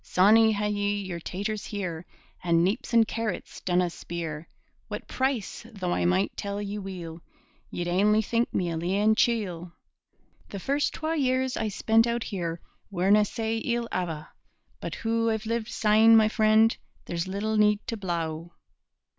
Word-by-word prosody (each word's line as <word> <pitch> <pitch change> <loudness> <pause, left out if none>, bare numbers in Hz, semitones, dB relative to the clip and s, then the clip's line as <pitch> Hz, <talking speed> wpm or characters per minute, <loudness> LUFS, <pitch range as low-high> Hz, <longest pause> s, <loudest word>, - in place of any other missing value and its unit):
Sawney, 220 +4 +5
had 210 0 -1
ye 205 0 0
yer 180 -3 -5
taters 205 +5 -4
here 180 -5 -5 0.4
And 170 -1 +3
neeps 220 +8 -2
and 230 -2 +5
carrots 225 -4 -4
dinna 180 -1 +1
speer 165 -2 -6 0.4
What - - -6
price; 260 -6 -2
though 185 -5 -3
I - - 0
might 185 +2 +1
tell 200 0 -4
ye 205 0 -4
weel, 175 -4 -7 0.5
Ye'd 175 - -4
ainly 210 +5 +3
think 235 +2 0
me 175 -2 -1
a 165 - -2
leein' 195 +6 +2
chiel. 185 -7 0 0.8
The 200 - -6
first 280 +8 0
twa 320 +1 -2
years 260 -2 +1
I 220 - -1
spent 225 +3 +2
out 235 0 -1
here 170 -4 -4 0.3
Werena 200 +2 +3
sae 225 +1 -2
ill 235 +1 -1
ava'; 165 -4 -3 0.5
But - - -5
hoo 230 0 0
I've 220 0 -2
lived 230 0 -2
syne; 225 0 +5
my 215 -1 +5
freend, 220 0 +4 0.3
There's 170 +1 -3
little 205 +3 -2
need 210 0 +3
to 230 - -3
blaw. 170 -4 -3
205 Hz, 160 wpm, -27 LUFS, 180-225 Hz, 0.8 s, Sawney